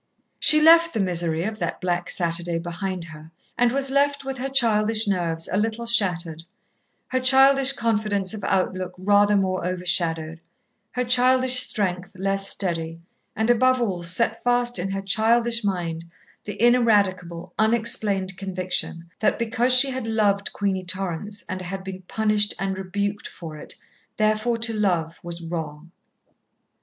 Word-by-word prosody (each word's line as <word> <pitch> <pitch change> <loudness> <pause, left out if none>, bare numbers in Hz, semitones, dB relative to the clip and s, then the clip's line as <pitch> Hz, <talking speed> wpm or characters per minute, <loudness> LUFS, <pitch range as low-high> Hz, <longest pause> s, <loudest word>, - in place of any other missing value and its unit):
She 305 - +5
left 330 0 +5
the - - 0
misery 170 -3 -1
of 215 +2 -5
that 170 - -4
black 175 -1 -2
Saturday 170 -1 -1
behind 175 +2 -4
her, 155 -1 -12 0.3
and 245 -1 +2
was 270 +1 -2
left 280 0 0
with 270 -1 -5
her 270 +2 -3
childish 225 -4 +2
nerves 170 -4 0
a 185 - 0
little 225 +2 -2
shattered, 180 -8 +2 0.7
her 260 - 0
childish 270 +1 +5
confidence 210 -5 +1
of 210 -2 -6
outlook 185 -1 -2
rather 205 +2 +3
more 185 -2 -1
overshadowed, 170 -3 -1 0.5
her 250 - -1
childish 255 +1 +3
strength 190 -6 -2
less 195 +1 -1
steady, 165 -3 -3 0.4
and, 220 +2 +1
above 255 +2 +2
all, 195 -7 -2
set 225 +6 0
fast 245 -2 +1
in 185 +2 -3
her 195 0 -4
childish 230 +3 +2
mind 170 -4 -3 0.4
the 205 -1 -7
ineradicable, 200 -8 +1
unexplained 215 -4 +1
conviction 185 -3 -3
that 215 - +1
because 235 +2 0
she 260 +2 +6
had 255 -3 -5
loved 205 -3 0
Queenie 195 -2 -2
Torrance 190 +2 -5
and 185 -1 -5
had 190 +1 -6
been 190 -1 -8
punished 210 -1 0
and 195 0 -3
rebuked 200 +2 -4
for 160 -3 -10
it, 150 - -11 0.4
therefore 215 +2 0
to 230 0 0
love 175 -6 -1
was 170 0 -2
wrong. 165 -1 -7
200 Hz, 150 wpm, -23 LUFS, 180-230 Hz, 0.7 s, she